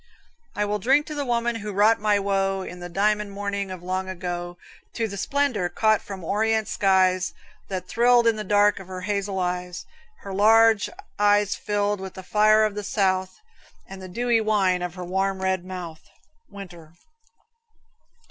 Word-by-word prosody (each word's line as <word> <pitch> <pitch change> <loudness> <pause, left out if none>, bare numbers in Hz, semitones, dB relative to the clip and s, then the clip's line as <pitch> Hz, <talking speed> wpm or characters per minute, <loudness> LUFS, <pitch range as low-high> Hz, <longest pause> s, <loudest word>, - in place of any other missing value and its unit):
I 210 - 0
will 210 0 -2
drink 270 +8 +3
to 305 - -7
the 290 -2 -3
woman 235 -1 0
who 210 -1 -6
wrought 210 +3 +3
my 210 0 +2
woe, 195 -1 0
In 180 -1 -9
the 175 0 -7
diamond 210 +3 0
morning 200 -1 -3
of 185 -2 -8
long 185 +1 -3
ago; 175 -1 -5 0.4
To 225 -2 -1
the 200 - -7
splendor, 240 -4 0
caught 215 +1 +2
from 195 -3 -8
Orient 220 +3 0
skies, 185 -1 +2 0.3
That 185 -2 -5
thrilled 240 +2 +4
in 230 -1 +3
the 215 - -4
dark 205 +1 +3
of 190 - -11
her 185 -1 -7
hazel 200 0 -2
eyes, 180 -1 -3 0.4
Her 195 - -7
large 220 +1 +4 0.3
eyes 205 0 +3
filled 205 -1 -1
with 190 -1 -8
the 190 - -9
fire 215 +2 +4
of 215 - -2
the 210 0 -5
south, 190 - -1 0.5
And 195 0 -10
the 185 - -9
dewy 235 +3 +1
wine 195 -4 +1
of 180 -1 -4
her 180 -1 -6
warm 190 +1 -1
red 190 -1 -1
mouth. 180 -4 -8 0.5
Winter. 175 -5 -11
200 Hz, 175 wpm, -24 LUFS, 185-215 Hz, 0.5 s, thrilled